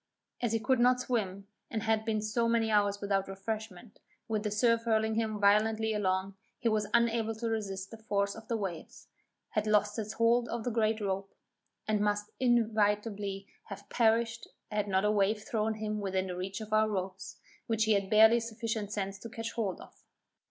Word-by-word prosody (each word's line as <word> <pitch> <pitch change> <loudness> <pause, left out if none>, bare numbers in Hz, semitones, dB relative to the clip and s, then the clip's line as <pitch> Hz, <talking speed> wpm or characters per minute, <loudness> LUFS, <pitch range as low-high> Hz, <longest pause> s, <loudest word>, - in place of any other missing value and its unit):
As 240 -3 0
he 225 - +2
could 250 +2 +1
not 250 +1 +4
swim, 200 -6 -2 0.2
and 220 -2 -3
had 220 -1 +1
been 215 -1 0
so 230 +2 0
many 230 -1 +2
hours 205 -1 +2
without 195 -1 0
refreshment, 210 +1 -6 0.3
with 220 -2 -1
the 210 - -1
surf 230 +2 +2
hurling 220 -1 +2
him 220 -1 -1
violently 220 +2 +3
along, 190 -1 0 0.2
he 240 - -1
was 215 -1 0
unable 230 -1 +2
to 230 +2 -3
resist 195 -3 -3
the 225 - -10
force 200 -2 0
of 225 -1 -11
the 230 - 0
waves, 190 -6 -6 0.4
had 215 -1 -1
lost 210 0 +2
his 215 -1 -3
hold 235 +1 +2
of 235 -1 -3
the 245 - -1
great 220 -1 +1
rope, 195 -1 -3 0.5
and 215 -1 +1
must 205 0 0
inevitably 210 -4 +1 0.2
have 200 - -9
perished 230 0 +1 0.2
had 210 -1 -1
not 190 0 +1
a 210 - +3
wave 210 +1 +1
thrown 220 -3 -1
him 215 0 -3
within 190 -1 -1
the 180 -1 -5
reach 190 +4 -4
of 215 0 -6
our 215 0 +4
ropes, 190 -1 -4 0.3
which 225 -1 +1
he 220 0 +3
had 200 -1 0
barely 220 +2 +7
sufficient 225 -2 -4
sense 195 -2 -3
to 230 - -8
catch 225 0 -5
hold 210 -6 -2
of. - - -15
215 Hz, 190 wpm, -31 LUFS, 200-225 Hz, 0.5 s, barely